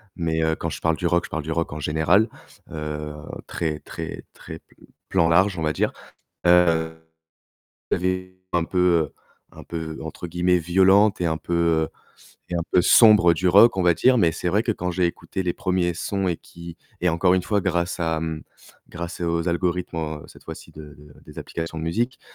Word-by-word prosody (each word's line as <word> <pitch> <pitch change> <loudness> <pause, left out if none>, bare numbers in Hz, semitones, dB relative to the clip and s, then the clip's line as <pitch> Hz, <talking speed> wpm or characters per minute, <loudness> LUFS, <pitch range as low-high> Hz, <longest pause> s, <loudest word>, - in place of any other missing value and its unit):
mais 80 -2 -1
heu, 80 0 +1
quand 80 - -4
je - - -7
parle 80 -1 +2
du 90 - -5
rock, 85 0 +1
je - - -11
parle 80 - -4
du 80 - -5
rock, 85 +1 -1
en 75 - -6
général, 80 +8 +2 0.4
heu, 75 -1 -5 0.3
très, 80 -2 -3
très, - - -7
très - - -10
pl - - -23 0.2
plan 85 -3 +2
large, 95 +3 +3
on - - -3
va 75 -1 0
dire, - - 0 0.5
heu, 85 -2 +4 1.0
j'avais 95 0 -2
un 85 -2 +1
peu, 90 +2 -3
heu, 85 -4 +2 0.4
un - - -12
peu 80 -2 -6
entre 80 +2 -7
guillemets 90 +1 +1
«violente» 95 +5 +4
et - - +1
un 80 -1 0
peu, 85 - -4
heu 85 -2 +2 0.6
et 90 - -5
un 85 - 0
peu 90 - +4
sombre 100 -4 +6
du 90 +3 0
rock, 100 +5 +6
on 95 - +1
va 90 -1 +5
dire 130 +6 +4
mais 85 -6 +4
c'est 85 +2 -3
vrai 100 +5 +2
que 115 - -1
quand 90 -4 -2
j'ai 90 +1 0
écouté 95 +2 -4
les 90 -2 -1
1ers 90 -2 -1
sons 95 +2 -2
et 85 - -1
qui 85 0 -12 0.2
et 90 - +2
encore 90 +2 +3
une 95 - +1
fois 105 +1 0
grâce 90 -1 -1
à, 80 -2 -1
mmh, 80 -1 -4 0.5
grâce 85 +1 -7
aux 85 0 -1
algorithmes, 85 0 -1
heu, 80 -2 -4
cette - - -17
fois-ci - - -9
de 75 -1 -12
de 75 0 -16
des - - -11
applications 80 0 -6
de - - -5
musique 120 +10 -2
85 Hz, 205 wpm, -23 LUFS, 80-90 Hz, 1.0 s, sombre